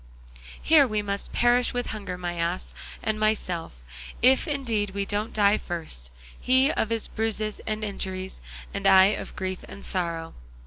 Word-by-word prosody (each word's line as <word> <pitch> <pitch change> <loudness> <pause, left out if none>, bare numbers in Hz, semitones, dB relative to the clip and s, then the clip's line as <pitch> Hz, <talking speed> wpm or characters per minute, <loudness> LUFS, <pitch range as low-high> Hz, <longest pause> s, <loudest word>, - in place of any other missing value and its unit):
Here 305 -4 +5 0.2
must 200 0 -3
we - - -6
perish 245 +1 +3
with 245 - -1
hunger, 200 -4 -5
my 175 -1 -3
ass 170 +2 -2 0.3
and 215 -1 -1
myself, 205 -6 0 0.5
if 260 +1 +5
indeed 230 -9 -1
we 200 0 -1
don't 210 +2 -2
die 205 0 +3
first, 160 - -6 0.3
he 260 +3 +4
of 220 - -1
his 230 -1 -1
bruises 215 -1 -2
and 215 0 -2
injuries, 190 -2 -5 0.3
and 200 -1 0
I 190 +1 +7
of - - -6
grief 185 -1 -3
and 200 - -10
sorrow. 170 -3 -2
205 Hz, 160 wpm, -26 LUFS, 185-225 Hz, 0.5 s, I